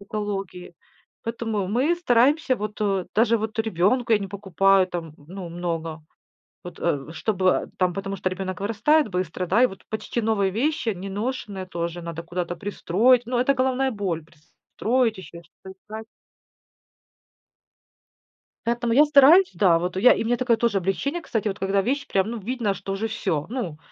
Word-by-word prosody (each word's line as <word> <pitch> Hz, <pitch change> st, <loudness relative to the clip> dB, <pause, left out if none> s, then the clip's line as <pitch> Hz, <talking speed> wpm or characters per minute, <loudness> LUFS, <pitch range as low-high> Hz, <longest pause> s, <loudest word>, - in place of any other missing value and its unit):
экологии. 195 Hz, -3 st, -5 dB, 0.5 s
Поэтому 225 Hz, -4 st, -2 dB
мы 275 Hz, +9 st, +2 dB
стараемся, 265 Hz, -1 st, +3 dB
вот, 210 Hz, +1 st, -6 dB
э 195 Hz, -3 st, 0 dB
даже 230 Hz, +1 st, +4 dB
вот 220 Hz, +2 st, -5 dB
ребёнку 225 Hz, +3 st, +1 dB
я 215 Hz, -, +5 dB
не 195 Hz, -1 st, -5 dB
покупаю, 195 Hz, 0 st, +2 dB
там, 170 Hz, -4 st, -6 dB
ну, 185 Hz, -2 st, -7 dB
много. 165 Hz, -2 st, -4 dB, 0.6 s
Вот, -, -, -9 dB
э, 145 Hz, +3 st, -1 dB
чтобы, 190 Hz, -3 st, +3 dB
а, -, -, -7 dB
там, 180 Hz, -1 st, +2 dB
потому 195 Hz, +1 st, -4 dB
что 185 Hz, 0 st, -1 dB
ребёнок 185 Hz, 0 st, -4 dB
вырастает 230 Hz, +9 st, +2 dB
быстро, 180 Hz, 0 st, -3 dB
да? 210 Hz, +8 st, +3 dB
И -, -, +7 dB
вот, 190 Hz, -, -11 dB
почти 220 Hz, +2 st, -3 dB
новые 210 Hz, -3 st, +1 dB
вещи, 255 Hz, +1 st, 0 dB
неношеные 195 Hz, 0 st, -4 dB
тоже 170 Hz, -1 st, -4 dB
надо 165 Hz, -1 st, -6 dB
куда-то 175 Hz, +1 st, -4 dB
пристроить. 215 Hz, +4 st, +2 dB
Ну, 245 Hz, 0 st, -1 dB
это 265 Hz, +3 st, +3 dB
головная 260 Hz, +1 st, +1 dB
боль: 195 Hz, -7 st, -2 dB
пристроить, 220 Hz, +9 st, -2 dB
ещё 170 Hz, -1 st, -10 dB
что-то 180 Hz, +2 st, -15 dB
искать. 220 Hz, +2 st, -9 dB, 2.6 s
Поэтому 235 Hz, 0 st, 0 dB
я 285 Hz, +5 st, +7 dB
стараюсь 300 Hz, +6 st, +6 dB
да. 175 Hz, -5 st, +4 dB
Вот 180 Hz, +2 st, -3 dB
и 190 Hz, -, -1 dB
я, 250 Hz, -, +8 dB
и -, -, -2 dB
мне 240 Hz, +1 st, +1 dB
такое 245 Hz, -3 st, +2 dB
тоже 230 Hz, -4 st, +1 dB
облегчение. 235 Hz, -, -1 dB
Кстати, 225 Hz, -8 st, -2 dB
вот 200 Hz, 0 st, -3 dB
когда 195 Hz, +1 st, +1 dB
вещь 280 Hz, +6 st, -2 dB
прям, 195 Hz, +2 st, +1 dB
ну, 235 Hz, -, -4 dB
видно, 225 Hz, -1 st, -2 dB
что 195 Hz, -, -5 dB
уже 210 Hz, +3 st, -2 dB
всё, 170 Hz, -8 st, -2 dB
ну, 210 Hz, -, -4 dB
205 Hz, 170 wpm, -24 LUFS, 185-235 Hz, 2.6 s, я